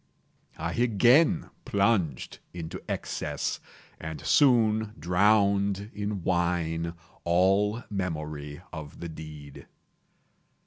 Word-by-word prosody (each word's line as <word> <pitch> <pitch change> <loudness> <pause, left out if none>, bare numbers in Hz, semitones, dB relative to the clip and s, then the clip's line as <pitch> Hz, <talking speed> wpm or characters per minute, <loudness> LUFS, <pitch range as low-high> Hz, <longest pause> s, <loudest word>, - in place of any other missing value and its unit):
I 85 +1 -3
again 125 - +4
plunged 100 - 0 0.2
into 85 +2 -6
excess, - - -3 0.4
and 80 -1 -6
soon 110 -6 +3
drowned 100 +4 +2
in 105 -3 -3
wine 85 -2 0 0.3
all 95 +6 +2
memory 75 -5 -4
of 75 -3 -8
the 85 - -5
deed. 75 -3 -10
95 Hz, 85 wpm, -28 LUFS, 80-105 Hz, 0.4 s, again